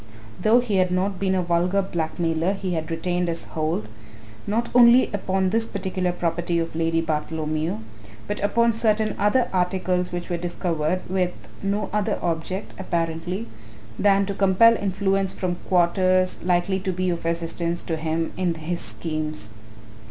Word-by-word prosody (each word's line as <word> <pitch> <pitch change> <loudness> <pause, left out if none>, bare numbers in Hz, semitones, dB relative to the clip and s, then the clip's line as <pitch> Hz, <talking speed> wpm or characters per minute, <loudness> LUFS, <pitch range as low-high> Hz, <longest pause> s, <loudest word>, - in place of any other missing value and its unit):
Though 230 +3 +5
he 215 -5 -1
had 185 -1 +3
not 185 +1 -1
been 190 -1 +1
a 185 - +1
vulgar 175 +3 +1
blackmailer 165 0 -1
he 195 -2 -3
had 160 -1 -3
retained 175 +2 -1
his 165 0 -2
hold, 155 -9 -2 0.6
not 230 +3 0
only 245 +1 +7
upon 190 -1 0
this 225 +1 +1
particular 185 -2 -2
property 170 0 -1
of 165 -1 -2
Lady 165 0 +1
Bartholomew, 155 -2 -2 0.5
but 205 - -3
upon 235 +3 +2
certain 220 -1 +1
other 235 +4 +3
articles 180 0 0
which 175 0 -4
were 175 - -2
discovered, 175 -1 -1
with 180 -1 0 0.3
no 200 +1 -1
other 210 0 0
object, 175 +4 -2
apparently, 175 +3 -2 0.5
than 200 -1 +4
to 200 - -3
compel 200 +4 +5
influence 195 -1 0
from 180 -2 -2
quarters 185 +1 +3
likely 180 +2 +1
to 190 0 -2
be 185 0 -1
of 170 - -3
assistance 170 +1 -1
to 165 - -2
him 160 +1 -2
in 180 -2 0
his 165 +2 -3
schemes. 155 -9 -2
180 Hz, 150 wpm, -24 LUFS, 165-195 Hz, 0.6 s, only